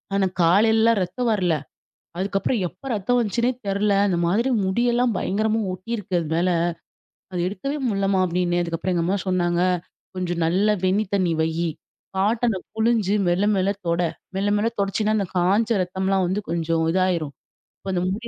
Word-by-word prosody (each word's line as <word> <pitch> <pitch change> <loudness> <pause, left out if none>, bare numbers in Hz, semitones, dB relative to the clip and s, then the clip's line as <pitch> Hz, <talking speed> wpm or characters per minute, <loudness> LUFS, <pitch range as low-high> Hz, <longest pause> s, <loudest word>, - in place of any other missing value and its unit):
ஆனா, 195 -1 +2 0.2
காலைலலாம் 220 +5 +4
ரத்தம் 235 +7 -2
வரல. 180 -5 +1 0.6
அதுக்கப்புறம் 195 +4 0
எப்ப 270 - -16
ரத்தம் 220 +5 +1
வந்துச்சுன்னே 235 +2 +1 0.2
தெரில. 200 +1 +1 0.2
இந்த 180 -3 0
மாதிரி 225 +8 +1 0.2
முடியெல்லாம் 240 +4 +1
பயங்கரமா 215 +3 0
ஒட்டியிருக்கு 185 -1 -3
அது 165 - -4
மேல. 175 +2 +2 0.8
அத 180 - -3
எடுக்கவே 210 +10 -3
முட்லம்மா" 195 -2 +1
அப்பிடின்னேன். 175 0 0
அதுக்கப்பறம் 170 +2 -2
எங்க 170 -1 +1
அம்மா 190 +3 +1
சொன்னாங்க, 175 -1 +1 0.5
"கொஞ்சம் 175 -2 -2
நல்லா 200 +6 +2
வெண்ணி 200 +4 +2
தண்ணீ 180 -4 +1
வையு. 165 +1 0 0.5
காட்டன 220 +1 +1 0.2
புழிஞ்சு 220 -3 +2
மெல்ல 175 +3 +2
மெல்ல 190 +1 +1 0.2
தொட. 170 +1 +1 0.3
மெல்ல 195 +1 0
மெல்ல 220 +2 +1
தொடச்சின்னா, 210 +2 +1
அந்த 200 -3 -1
காஞ்ச 200 +6 +2
ரத்தம்லாம் 190 +1 0
வந்து 190 +4 -1
கொஞ்சம் 165 -1 0
இதாயிரும். 175 -5 0 0.5
கொஞ்சம் 185 -1 0
முடி" 225 +4 -5
190 Hz, 150 wpm, -23 LUFS, 175-215 Hz, 0.8 s, காலைலலாம்